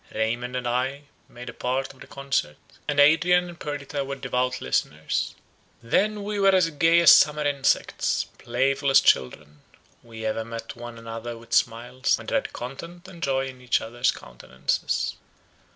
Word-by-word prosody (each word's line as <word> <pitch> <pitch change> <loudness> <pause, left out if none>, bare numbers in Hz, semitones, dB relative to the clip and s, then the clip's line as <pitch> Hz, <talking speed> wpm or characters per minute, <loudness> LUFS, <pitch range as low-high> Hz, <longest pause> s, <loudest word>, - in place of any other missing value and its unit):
Raymond 120 +3 -1
and 125 -1 -2
I 130 +4 -1 0.3
made 125 +1 -11
a - - -6
part 130 +2 -2
of 130 - -22
the - - -12
concert, 135 - -2 0.3
and 145 -1 0
Adrian 175 +4 +5
and 170 -1 -12
Perdita 145 -1 -4
were 135 0 -5
devout 125 -1 -1
listeners. 75 +1 -2 0.5
Then 205 - +1
we 205 0 -3
were 195 -1 +5
as 170 -3 +3
gay 165 +3 +4
as 170 - +9
summer 150 0 +5
insects, 140 -2 +1 0.2
playful 135 +3 0
as 135 - +7
children; 75 +3 0 0.4
we 115 -1 -9
ever 110 +1 -1
met 115 0 -7
one 120 0 -9
another 115 +1 -7
with 115 0 -11
smiles, 120 +2 +1
and - - -8
read - - 0
content 170 +9 -8
and 175 -3 -12
joy 135 -2 0
in 130 -1 -12
each 125 -1 +1
other's 120 +2 -1
countenances. 65 +2 -3
130 Hz, 165 wpm, -25 LUFS, 115-145 Hz, 0.5 s, as